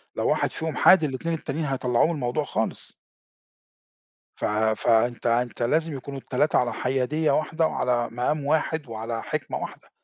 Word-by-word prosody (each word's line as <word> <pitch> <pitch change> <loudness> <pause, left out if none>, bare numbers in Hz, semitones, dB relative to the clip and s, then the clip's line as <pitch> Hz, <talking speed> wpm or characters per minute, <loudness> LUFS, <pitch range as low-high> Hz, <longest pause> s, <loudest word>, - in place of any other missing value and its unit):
لو - - 0
واحد - - +1
فيهم 160 -3 -4
حاد 185 +3 +6
ال2 150 +4 -2
التانيين 160 -1 -3
هيطلّعوه 130 -1 +1
من - - -1
الموضوع 135 +1 -1
خالص. 110 -5 -3 1.4
ف - - -2 0.3
فأنت 120 +1 +2
أنت 120 +1 0
لازم 155 +3 0
يكونوا 135 +1 -7
ال3 135 +3 +1
على 120 -2 0
حيادية 135 +5 0
واحدة 160 +2 +1
وعلى 120 -1 0
مقام 140 +5 -1
واحد 155 -1 0
وعلى 115 0 -4
حِكمة - - -3
واحدة، - - -8
135 Hz, 150 wpm, -25 LUFS, 120-155 Hz, 1.4 s, حاد